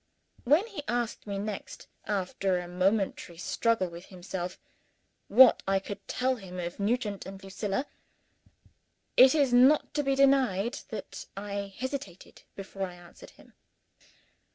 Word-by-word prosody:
When 300 - +4
he 410 -9 -7
asked 240 -3 -2
me 200 -1 -3
next 205 0 -6 0.2
after 195 -2 0
a 180 0 -5
momentary 185 -1 0
struggle 225 +2 0
with 170 +1 -10
himself 180 -1 -6 0.7
what 250 +4 +7
I 195 0 +3
could 195 +1 -7
tell 255 0 0
him 185 -4 -9
of 175 +1 -5
Nugent 210 -2 -1
and 195 0 -10
Lucilla, 195 +5 -3 1.3
it 260 +3 +7
is 280 -5 +3
not 260 +5 +5
to 295 - +1
be 275 -1 +1
denied 260 -6 +3
that 215 -4 -7
I 200 -1 -5
hesitated 260 -7 -6
before 195 0 -5
I 180 - -11
answered 175 0 -14
him. - - -20
200 Hz, 135 wpm, -29 LUFS, 190-255 Hz, 1.3 s, what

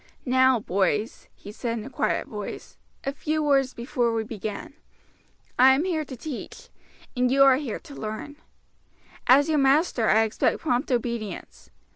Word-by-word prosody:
"Now, 260 -1 +4
boys," 210 +3 -1
he 205 - -11
said 230 +2 -3
in 220 - -6
a - - -7
quiet - - -1
voice, - - -8 0.3
"a 275 - -2
few 310 +1 -2
words 275 -3 +2
before 235 0 -1
we 225 - 0
begin. 215 +1 -6 0.9
I 265 +1 +7
am 285 - 0
here 340 -4 -1
to 260 -2 -9
teach, 275 +1 -8 0.5
and 250 0 +2
you 275 +2 +5
are 270 -1 +6
here 270 -6 -4
to 310 -4 -13
learn. 220 +5 -6 0.9
As 275 +4 +6
your 310 -2 +2
master 270 -4 +2
I 220 +1 +5
expect 220 -1 0
prompt 265 -2 -1
obedience. 235 -3 -4
255 Hz, 160 wpm, -25 LUFS, 225-280 Hz, 0.9 s, I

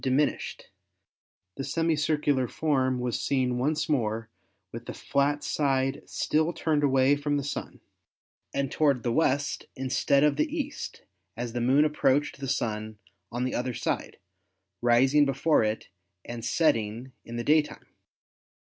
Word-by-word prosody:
diminished; 135 +3 0 0.9
the - - -3
semi 165 +3 +1
circular 145 -4 +1
form 130 -3 0
was 125 -1 -2
seen 125 -3 0
once 150 +4 0
more 115 -5 -1 0.4
with 115 +1 -8
the - - -6
flat 145 +1 0
side 135 -1 0
still 160 +3 0
turned 155 -3 0
away 135 0 +4
from 145 0 -1
the 140 - -2
Sun 145 - -5 0.7
and 140 -1 -1
to - - -8
ward 140 -6 +3
the 120 - 0
west 145 +1 +1
instead 135 +1 +2
of 150 -2 +3
the 315 +1 0
east 290 -1 -5 0.3
as 120 -1 -4
the 120 - -2
Moon 135 +5 +4
approached 145 -1 +1
the 135 - -4
Sun 110 -5 -2 0.3
on 120 +1 -2
the 130 - -1
other 125 -1 -2
side, 120 - -3 0.6
rising 130 +5 +5
before 140 0 +2
it 110 +1 -2 0.4
and 120 -1 -6
setting 115 -4 0
in 115 - -8
the 120 - -2
daytime. 150 +2 +1
135 Hz, 145 wpm, -27 LUFS, 120-150 Hz, 0.9 s, rising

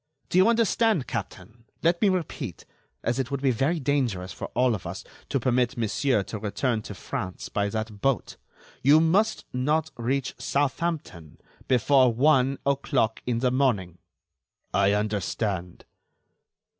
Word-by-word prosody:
Do 180 - +3
you 190 - +6
understand, 225 - +2
captain? 110 0 -7 0.2
Let 170 +1 +2
me 210 - +5
repeat: 185 -4 -3 0.4
As 120 +3 0
it 130 -2 -1
would 140 -1 -3
be 135 - +4
very 140 +8 0
dangerous 125 -10 -1
for - - -6
all 125 0 +3
of 95 -6 -5
us 95 +3 -6 0.3
to 135 - +1
permit 125 0 +1
Monsieur 115 0 +1
to 110 - -6
return 110 +3 -1
to 105 - -8
France 95 -1 -5
by 100 0 0
that 110 -1 -5
boat, 135 -1 0 0.4
you 145 +4 +6
must 195 +7 +2
not 150 +5 0
reach 130 +3 -1
Southampton 140 - -2 0.3
before 130 +1 +4
one 135 +1 +3
o'clock 135 -4 0
in 120 -1 0
the 125 -1 +2
morning." 105 -10 0 0.7
"I 100 0 +3
understand." 105 -3 -2
125 Hz, 145 wpm, -26 LUFS, 105-140 Hz, 0.7 s, you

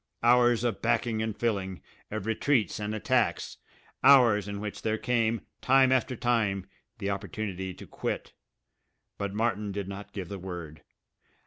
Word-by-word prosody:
Hours 120 -1 +5
of 120 -2 -1
backing 115 -1 +1
and 110 -1 -3
filling, 100 -5 -1 0.3
of 110 -2 -4
retreats 110 -1 +1
and 105 +1 -3
attacks, 110 - 0 0.5
hours 120 -7 +6
in 100 0 -4
which 105 0 -5
there 110 0 0
came, 115 -2 +1 0.2
time 130 0 +5
after 130 0 +2
time, 110 -6 +1 0.3
the 100 - -2
opportunity 95 -1 -4
to - - -11
quit. - - -4 0.9
But 100 -1 -3
Martin 105 -2 0
did 100 -1 -4
not 100 +1 -8
give 95 -4 -5
the 100 +1 -6
word. 85 -5 -7
110 Hz, 145 wpm, -28 LUFS, 100-120 Hz, 0.9 s, hours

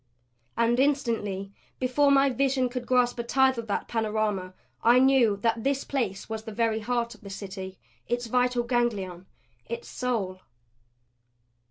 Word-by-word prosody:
And 235 +1 +2
instantly, 225 -8 0 0.2
before 260 +3 +2
my 275 0 +5
vision 260 0 +1
could 245 0 -5
grasp 250 -1 +2
a - - -1
tithe 265 +1 +3
of 230 - -6
that 205 - -2
panorama, 215 -4 -1 0.3
I 235 +2 +5
knew 255 -5 +4
that 225 -1 +1
this 275 0 0
place 225 -9 -2
was 220 -1 -4
the 220 - -8
very 225 0 0
heart 235 +1 -1
of 215 - -18
the 200 - -10
City; 190 -1 -7 0.3
its 240 +1 -1
vital 250 +1 +1
ganglion; 205 -7 -1 0.4
its 475 0 -5
soul. 205 -7 -2
235 Hz, 150 wpm, -27 LUFS, 210-255 Hz, 0.4 s, my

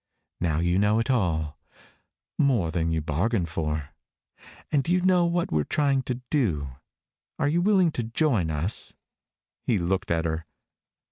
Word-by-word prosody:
Now 80 -3 0
you 85 +2 +2
know 105 +2 +3
it 115 +4 +1
all 80 - 0 0.8
more 120 - +2
than 85 -1 0
you 80 -1 0
bargained 85 +5 0
for. 75 -2 -3 0.8
And 145 -1 +1
you 180 +1 +3
know 180 -1 +4
what 170 0 -1
we're 75 -1 +2
trying 140 - +1
to 125 0 -2
do. 85 - 0 0.7
Are - - +1
you 165 +4 +2
willing 190 -3 +4
to 120 - -2
join 115 - +1
us?" 80 +7 +1 0.7
He 115 - +1
looked 95 +3 -1
at 85 0 0
her. 80 -1 -3
100 Hz, 150 wpm, -26 LUFS, -, 0.8 s, know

